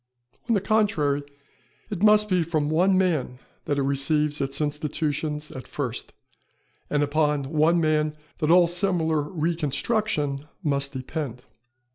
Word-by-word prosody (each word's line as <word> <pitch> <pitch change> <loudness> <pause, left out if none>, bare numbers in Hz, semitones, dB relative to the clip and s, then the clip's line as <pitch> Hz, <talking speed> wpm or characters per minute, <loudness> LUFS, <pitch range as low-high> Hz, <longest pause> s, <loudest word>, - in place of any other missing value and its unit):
On 230 - +4
the 200 - +1
contrary, 185 -9 +1 0.7
it 195 -3 -4
must 210 0 +5
be 185 -3 +2
from 155 -2 -1
one 185 +4 +3
man 155 -9 0 0.3
that 145 - -1
it 140 - +1
receives 145 +2 +1
its 135 0 -1
institutions 150 0 -2
at 130 -1 -9
first, 125 -5 -4 0.8
and 145 0 +1
upon 150 -1 +1
one 155 +4 +2
man 155 -1 +1 0.2
that 155 -2 0
all 175 +1 +7
similar 170 -3 +1
reconstruction 150 - -1 0.2
must 140 -2 -1
depend. 130 -1 -5
150 Hz, 130 wpm, -25 LUFS, 145-170 Hz, 0.8 s, all